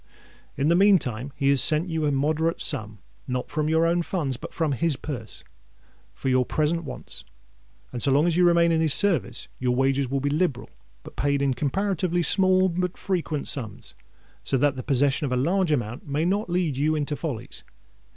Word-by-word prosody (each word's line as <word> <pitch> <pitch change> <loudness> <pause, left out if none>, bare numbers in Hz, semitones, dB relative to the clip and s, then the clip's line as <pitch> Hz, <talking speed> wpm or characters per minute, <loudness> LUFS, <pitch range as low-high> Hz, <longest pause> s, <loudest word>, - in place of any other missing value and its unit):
In 140 - +1
the 170 - +4
meantime 145 - +2
he 140 -2 +1
has 140 -2 +4
sent 155 +5 +1
you 160 -2 -1
a - - +1
moderate 155 +4 0
sum—not 125 +1 -4
from 155 0 -1
your 160 +1 +3
own 170 +1 +2
funds, 160 -7 -2
but - - -9
from 160 -3 -1
his 150 +3 0
purse—for 130 0 -10
your 130 -1 +3
present 155 +5 -1
wants; - - -9 0.7
and 125 - -5
so 140 - +3
long 145 +4 +4
as 175 -2 +1
you 180 - +3
remain 170 -1 +4
in 160 -1 +2
his 155 -3 +4
service, 165 - +2
your 125 -1 0
wages 135 0 +1
will 135 +1 -1
be 140 +1 -1
liberal, 150 -5 -1 0.3
but - - -12
paid 140 0 0
in 140 -1 +1
comparatively 175 +4 -1
small 185 +1 +3
and 180 0 -2
frequent 170 -6 -2
sums, 115 -7 -5 0.5
so 135 - 0
that 140 +1 +2
the 130 - -5
possession 140 +2 +1
of 135 - -3
a - - +1
large 170 +6 +1
amount 120 -3 -2
may 145 +3 -1
not 200 +2 0
lead 175 -6 0
you 155 +3 +1
into 150 -1 -2
follies. 145 -8 -6
150 Hz, 190 wpm, -25 LUFS, 135-170 Hz, 0.7 s, the